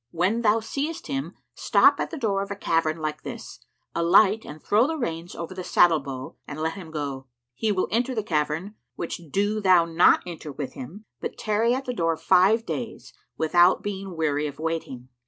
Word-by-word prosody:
When 185 - 0
thou 220 0 +3
seest 300 +9 -4
him 275 0 -4 0.2
stop - - +4
at - - -2
the 330 - -6
door 205 -7 0
of 200 - -5
a 200 - -4
cavern 165 -4 0
like 155 -1 -4
this, - - -8 0.3
alight 195 +5 +4
and 150 +1 -9
throw 215 - +3
the 320 +1 -2
reins 170 - -4
over 170 +2 -6
the 185 0 -6
saddle 170 -2 +4
bow 135 -2 -7
and 140 - -7
let 160 +1 -1
him 185 -5 -9
go. 140 -4 -5 0.3
He 215 - -1
will 185 -2 0
enter 245 +4 0
the 220 - -1
cavern, 160 +2 -1 0.2
which 170 - -5
do 205 +5 0
thou 185 -4 +5
not 165 +1 +4
enter 165 -3 -7
with 140 0 -6
him, 180 - -9
but - - -5
tarry 225 +3 +1
at 265 +1 -4
the 250 - -3
door 165 -6 0
five 190 +7 +4
days, 235 -3 -6 0.2
without 175 +3 +4
being 195 -3 -5
weary 150 -2 0
of 145 -1 -8
waiting. 155 -6 -4
180 Hz, 195 wpm, -25 LUFS, 160-215 Hz, 0.3 s, thou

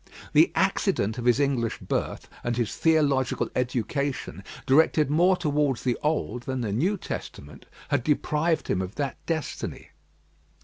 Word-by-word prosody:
The - - +6
accident 110 +4 +1
of 120 - -4
his 125 +2 +4
English 130 -5 0
birth - - -3 0.2
and 120 -1 -1
his 120 -4 -1
theological 145 -5 +2
education, 125 -1 -2 0.2
directed 150 +1 +4
more 180 +4 +4
towards 145 -5 0
the 125 -2 +1
Old 150 -6 -1
than 130 0 -3
the 110 -4 -2
New 180 - +1
Testament, 75 - -8 0.2
had - - +1
deprived 155 +3 +1
him 95 - 0
of 95 +2 -5
that 140 -2 -3
destiny. 160 -4 -4
135 Hz, 140 wpm, -26 LUFS, 120-150 Hz, 0.2 s, The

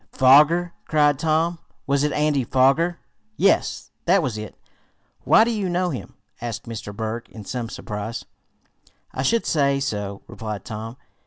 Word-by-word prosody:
"Foger!" 150 +6 +5
cried 145 -3 +3
Tom. 165 +1 +1 0.3
"Was 140 -1 +1
it 150 - +1
Andy 150 -2 +1
Foger?" 135 +8 +2 0.4
"Yes, 195 - +1
that 180 +1 +4
was 125 -6 -2
it. 110 -1 -7 0.7
Why, 220 - +7
do 235 - 0
you 205 -5 -1
know 180 0 0
him?" 130 - -7 0.3
asked 120 -2 -4
Mr. 115 -3 -7
Berg 110 +2 -5
in 110 -2 -11
some 120 -1 -4
surprise. 110 +1 -5 0.9
"I 130 - -3
should 230 - +1
say 140 -3 +2
so," 105 -7 -3
replied 105 -3 -6
Tom. 115 +2 -6
135 Hz, 150 wpm, -23 LUFS, 115-165 Hz, 0.9 s, Why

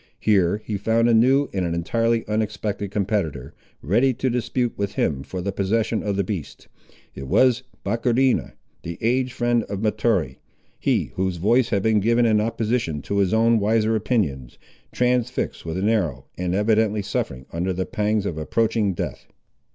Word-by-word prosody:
Here 100 -1 +2
he 105 - -2
found 115 +3 +2
a 120 - +4
new 130 +5 +4
and 95 -2 -1
an 85 -1 -1
entirely 115 +7 0
unexpected 105 -1 -2
competitor, 95 - -2 0.3
ready 120 - +2
to 130 +1 -1
dispute 120 0 -1
with 100 0 -3
him 70 -4 0
for 90 +6 -6
the 100 +2 -2
possession 110 +3 0
of 100 -1 -2
the 100 - +1
beast. 90 -6 -6 0.5
It 65 0 -8
was 130 - +3 0.2
Bohrecheena, 120 +4 +1 0.3
the 85 0 -6
aged 125 +2 0
friend 120 -1 +1
of 100 +1 -5
Mahtoree; 105 - 0 0.4
he - - 0
whose 95 -1 -1
voice 115 +7 +2
had 100 -3 0
been 110 -1 +3
given 115 +3 +3
in 110 -2 +3
opposition 110 - -1
to 100 - -1
his 95 -2 +2
own 115 +1 +4
wiser 110 +1 +2
opinions, 85 - -1 0.3
transfixed 125 -6 -1
with 80 +2 -3
an 95 +2 0
arrow, 95 - 0
and 90 0 -2
evidently 105 0 +2
suffering 65 -10 -3
under 90 +3 -1
the 95 0 -2
pangs 105 -1 -1
of 80 -5 -3
approaching 110 +4 0
death. - - -5
105 Hz, 165 wpm, -23 LUFS, 95-115 Hz, 0.5 s, a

